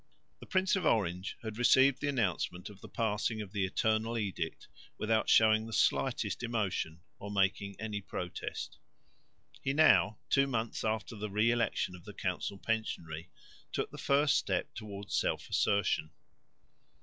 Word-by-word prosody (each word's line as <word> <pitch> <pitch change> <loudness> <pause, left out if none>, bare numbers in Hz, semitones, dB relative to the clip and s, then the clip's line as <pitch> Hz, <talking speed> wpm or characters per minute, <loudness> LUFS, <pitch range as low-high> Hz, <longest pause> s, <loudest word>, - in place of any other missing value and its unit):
The - - -12
Prince 190 +1 +2
of 190 - -1
Orange 95 -3 0
had 110 0 -5
received 130 +2 +5
the 145 - -1
announcement 95 - -1
of 100 -1 -15
the - - -10
passing 110 0 -1
of 105 -3 -6
the 100 -2 0
Eternal 110 +4 0
Edict 95 -6 -3 0.3
without 110 0 +1
showing 110 0 +5
the 115 - -8
slightest - - +1
emotion, 100 -8 -2 0.2
or 100 - -7
making 100 0 0
any 105 -2 -3
protest. 90 -2 -5 0.8
He 135 - 0
now, 140 -8 +5
two 135 0 +3
months 115 -4 -2
after 110 0 -2
the 105 0 -4
re 105 +4 +3
election 115 -6 0
of 85 - -14
the - - -10
council 100 - -2
pensionary, 90 -7 -3 0.4
took - - -2
the - - -9
first 140 +1 +3
step - - -1
towards 100 -2 -7
self - - 0
assertion. 100 -6 +2
110 Hz, 150 wpm, -32 LUFS, 100-115 Hz, 0.8 s, received